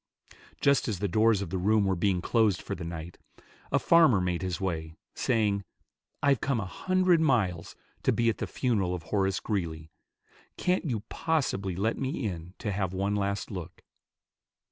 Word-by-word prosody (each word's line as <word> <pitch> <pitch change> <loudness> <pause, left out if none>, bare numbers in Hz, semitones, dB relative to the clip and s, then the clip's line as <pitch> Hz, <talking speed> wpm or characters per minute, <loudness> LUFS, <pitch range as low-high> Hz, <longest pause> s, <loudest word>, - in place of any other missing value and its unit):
Just 140 -1 +3
as 105 -5 -1
the 100 +3 -1
doors 110 +2 +3
of 85 - -7
the 95 - -1
room 105 +2 +3
were 95 -1 +1
being 90 0 +1
closed 110 -5 +2
for - - -5
the - - -6
night, 85 0 -7 0.5
a - - +4
farmer 165 - +5
made 90 -1 -1
his 90 -1 -2
way, 80 -4 -3 0.2
saying, 105 -4 +1 0.6
"I've 140 -4 +3
come 135 -4 0
a 105 - -3
hundred 185 - +2
miles 95 - +1 0.3
to - - +2
be 115 - +1
at 115 - +1
the - - -2
funeral 100 -8 0
of 85 - -7
Horace 95 +1 0
Greeley. 80 -6 -3 0.7
Can't 180 0 +1
you 115 -5 -1
possibly 125 - -1
let 110 +5 -1
me 135 -1 -2
in 90 -2 -5
to 105 - -3
have 95 -2 -2
one 100 +2 0
last 100 +1 -2
look?" 90 -5 -7
100 Hz, 175 wpm, -28 LUFS, 90-115 Hz, 0.7 s, farmer